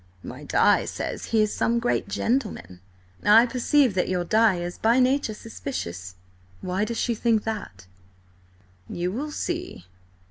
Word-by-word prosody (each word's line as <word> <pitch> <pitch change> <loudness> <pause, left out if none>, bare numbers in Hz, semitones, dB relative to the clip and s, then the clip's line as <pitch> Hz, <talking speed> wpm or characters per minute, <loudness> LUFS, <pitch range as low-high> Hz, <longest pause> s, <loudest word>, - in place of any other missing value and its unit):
My - - -9
Di - - +3
says - - -5
he 220 -2 +2
is 210 - -1
some 235 +1 +1
great 240 +1 0
gentleman." 205 - -2 0.4
"I 220 +3 +7
perceive 255 0 +2
that 185 - 0
your 180 -1 0
Di 215 +2 +3
is 175 0 -5
by 230 +3 +3
nature 255 -3 +1
suspicious. 95 - -6 0.5
Why 185 +3 -1
does 235 +1 -4
she 240 - 0
think 225 -1 +1
that?" 205 - -6 1.0
"You 175 +1 -2
will 280 +9 -4
see. 345 - -5
220 Hz, 145 wpm, -25 LUFS, 180-245 Hz, 1.0 s, I